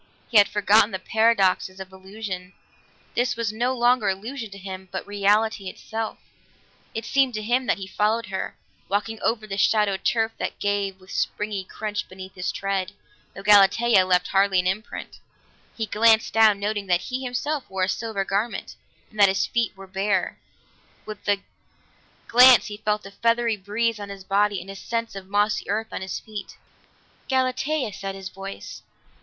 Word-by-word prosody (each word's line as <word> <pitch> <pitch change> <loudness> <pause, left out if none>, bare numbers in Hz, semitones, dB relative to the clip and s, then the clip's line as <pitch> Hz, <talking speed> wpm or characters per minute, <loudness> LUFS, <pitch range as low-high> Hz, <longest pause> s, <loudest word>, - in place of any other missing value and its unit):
He 220 - +8
had 205 - +5
forgotten 210 +1 +4
the 190 - -3
paradoxes 195 -3 +2
of 190 0 -8
illusion; 190 -1 -7 0.6
this 245 +1 +1
was 225 -2 -2
no 245 +3 0
longer 240 -2 +3
illusion 225 +5 -4
to 195 - -11
him, 190 -1 -8
but 190 - -4
reality 205 0 +1
itself. 220 +3 -5 0.8
It 225 0 -3
seemed 270 -3 +2
to 215 - -2
him 245 +3 +1
that - - +2
he 195 - -6
followed 215 +4 0
her, 190 -2 -5 0.3
walking 210 +2 -2
over 220 -1 0
the 200 -1 -4
shadowed 200 -2 +2
turf 225 -1 +1
that - - -3
gave 200 -2 -1
with 185 0 -15
springy 210 -2 -2
crunch 205 +2 -5
beneath 190 0 -10
his 180 -1 -3
tread, 195 -1 -2 0.4
though 195 - -8
Galatea 205 +1 +6
left 180 -1 +2
hardly 195 -1 +3
an 180 - 0
imprint. 195 +4 -4 0.6
He 225 - -1
glanced 225 +1 +3
down, 220 -2 +5
noting 205 -1 -2
that 180 -1 +2
he 260 +1 -4
himself 260 +3 -3
wore 190 -1 -1
a - - +2
silver 200 -1 -2
garment, 205 +5 -2 0.4
and 215 - -12
that 200 -1 +7
his 190 0 +1
feet 235 -2 0
were 195 - -10
bare; 190 0 -1 0.7
with 215 0 -9
the 200 -1 +1 0.9
glance 250 0 +8
he 205 - -6
felt 210 -1 -1
a 195 - -9
feathery 230 +2 +1
breeze 210 +3 -1
on 205 -1 -7
his 195 -1 -8
body 200 +1 +1
and 190 +3 -9
a - - -9
sense 230 +2 -3
of 195 -1 -8
mossy 205 +2 0
earth 220 +2 -2
on - - -4
his 190 0 -4
feet. 210 -3 -9 0.7
"Galatea," 260 -1 0
said 195 0 -5
his 190 -1 -7
voice. 195 +1 -8
205 Hz, 175 wpm, -24 LUFS, 195-225 Hz, 0.9 s, He